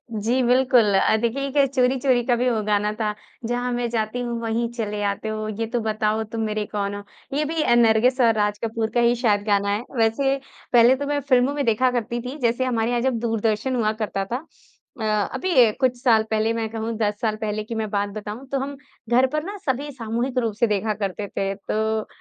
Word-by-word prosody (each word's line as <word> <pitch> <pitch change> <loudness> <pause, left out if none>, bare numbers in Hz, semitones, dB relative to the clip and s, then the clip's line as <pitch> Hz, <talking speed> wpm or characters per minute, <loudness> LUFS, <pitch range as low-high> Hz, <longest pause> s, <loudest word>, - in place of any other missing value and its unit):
जी, 230 +5 +1
बिल्कुल 245 -3 +4
अ, 195 - +4
देखिए 260 +4 -1 0.2
एक 275 - -1
चोरी-चोरी 255 -1 +2
का 245 - +3
भी 250 +1 +1
वो 225 -3 0
गाना 210 0 +1
था 210 -1 0 0.3
जहाँ 245 +1 -1
मैं 240 -1 -1
जाती 225 +1 -2
हूँ 240 -1 -3
वहीं 230 +1 -1
चले 210 -3 -3
आते 200 +2 -2
हो, 215 0 -3
ये 220 +2 -3
तो 240 +2 -1
बताओ 215 0 0
तुम 225 +1 -5
मेरे 215 -1 -1
कौन 200 -1 -3
हो। 205 - -7 0.3
ये 305 - +1
भी 320 +1 -1
नरगिस 240 +3 +4
और 230 -2 +5
राज 210 -1 0
कपूर 225 0 -1
का 240 - +2
ही 235 +1 +4
शायद 220 -4 +2
गाना 200 -1 +2
है, 205 +3 -1
वैसे 250 +5 +2 0.4
पहले 240 +2 +7
तो 285 +2 -4
मैं 290 0 0
फ़िल्मों 260 0 +2
में 290 -1 -1
देखा 240 +3 +2
करती 240 0 -2
थी 250 +4 -6
जैसे 240 +2 +1
हमारे 230 -3 0
यहाँ 240 -1 +1
जब 255 -2 0
दूरदर्शन 225 +2 0
हुआ 220 -3 +1
करता 195 -2 -2
था। 245 +9 -4 0.6
अ, - - -2 0.3
अभी 260 -12 +4
कुछ 255 -1 +2
साल 225 -4 +5
पहले 220 +1 +1
मैं 225 -1 -2
कहूँ 225 +1 -3
10 210 -1 -1
साल 220 -2 0
पहले 215 0 -2
की 230 +2 -6
मैं 220 -1 -2
बात 205 0 -1
बताऊँ 215 +5 -7
तो 275 - 0
हम, 280 +2 -4 0.3
घर 250 +2 +4
पर 305 0 0
ना 400 +4 -6
सभी 280 +1 -1
सामूहिक 240 +1 -3
रूप 230 -3 -1
से 235 - +4
देखा 215 +1 0
करते 200 +1 -3
थे, 195 0 -2
तो 220 +2 -2
230 Hz, 220 wpm, -23 LUFS, 215-250 Hz, 0.6 s, पहले